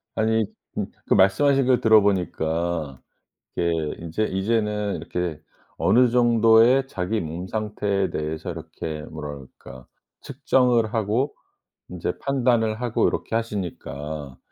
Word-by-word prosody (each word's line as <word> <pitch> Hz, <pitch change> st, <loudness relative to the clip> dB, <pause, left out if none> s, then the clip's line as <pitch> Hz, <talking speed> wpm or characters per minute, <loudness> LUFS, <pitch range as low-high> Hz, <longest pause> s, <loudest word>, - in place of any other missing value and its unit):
아니 110 Hz, 0 st, +2 dB, 0.3 s
음 -, -, -1 dB, 0.2 s
그 -, -, +3 dB
말씀하신 135 Hz, +8 st, +4 dB
걸 125 Hz, -2 st, +3 dB
들어 110 Hz, -1 st, +6 dB
보니까 85 Hz, -6 st, -1 dB, 0.6 s
이게 85 Hz, -1 st, +1 dB, 0.3 s
인제 85 Hz, +6 st, -2 dB
이제는 105 Hz, +1 st, -1 dB
이렇게 80 Hz, -1 st, -4 dB, 0.4 s
어느 125 Hz, +1 st, +4 dB
정도의 120 Hz, +2 st, +5 dB
자기 105 Hz, +1 st, -2 dB
몸 85 Hz, +3 st, -5 dB
상태에 105 Hz, -2 st, -1 dB
대해서 75 Hz, +1 st, -4 dB
이렇게 75 Hz, -1 st, -6 dB
뭐라 75 Hz, -2 st, -7 dB, 0.3 s
그럴까 65 Hz, 0 st, -12 dB, 0.4 s
측정을 120 Hz, -4 st, +1 dB
하고 110 Hz, +5 st, 0 dB, 0.6 s
인제 90 Hz, 0 st, -4 dB
판단을 120 Hz, -4 st, +1 dB
하고 120 Hz, -2 st, +1 dB
요렇게 115 Hz, -, -1 dB
하시니까 80 Hz, -, -5 dB
105 Hz, 270 characters per minute, -24 LUFS, 85-115 Hz, 0.6 s, 들어